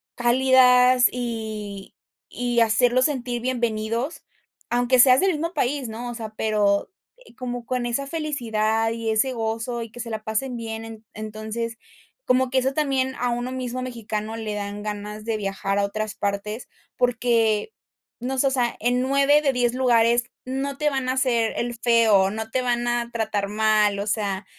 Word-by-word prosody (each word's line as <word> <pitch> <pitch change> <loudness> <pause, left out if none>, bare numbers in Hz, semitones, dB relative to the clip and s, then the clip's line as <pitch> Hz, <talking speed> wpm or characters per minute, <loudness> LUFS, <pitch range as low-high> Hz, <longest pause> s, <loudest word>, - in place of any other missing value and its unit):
cálidas 250 0 +5
y 220 -5 -5 0.3
y 240 -1 -1
hacerlos 245 +3 +3
sentir 245 -5 -2
bienvenidos, 235 +2 -2 0.4
aunque 245 +1 +2
seas 255 +3 +7
del 385 -1 +3
mismo 330 +3 -3
país, 275 -3 -1
¿no? 235 +2 -6
O 240 - -6
sea, 220 -2 -7
pero, 205 -2 +1 0.3
eh, - - -19
como 245 -1 -5
con 250 0 -2
esa 270 +4 -2
felicidad 225 -8 -1
y 230 -1 -3
ese 240 +5 +2
gozo, 230 +1 -3
y 230 - -9
que 245 +1 -7
se 230 - -6
la 215 -1 -5
pasen 240 +3 -2
bien. 225 -1 -5
En 225 -1 -11
entonces, 215 +2 -5 0.5
como 255 0 +2
que 260 - 0
eso 265 +1 0
también, 265 -3 0
a 245 - 0
uno 245 +1 -2
mismo 255 -1 -4
mexicano 225 -3 -4
le 220 -2 -4
dan 205 0 -5
ganas 210 0 -5
de 225 -1 -1
viajar 195 0 -2
a 200 - +2
otras 215 +1 -4
partes, 205 +3 -3 0.3
porque, 235 - +1 0.5
no 260 +2 -3
sé, 275 - +3
o - - +1
sea, 245 -3 0
en 245 +2 +2
9 275 +3 +4
de 280 -3 +1
10 245 -1 +1
lugares 240 -2 +3 0.2
no 270 +2 -3
te 300 0 +1
van 265 -3 -2
a - - +2
hacer 240 -4 +1
el 240 0 -2
feo, 225 -5 +4
no 220 +1 -5
te 255 - +1
van 240 -1 0
a 240 0 -1
tratar 215 -3 -1
mal, 215 -1 +2
o 205 - -3
sea, 200 -2 -1
235 Hz, 175 wpm, -24 LUFS, 220-255 Hz, 0.5 s, seas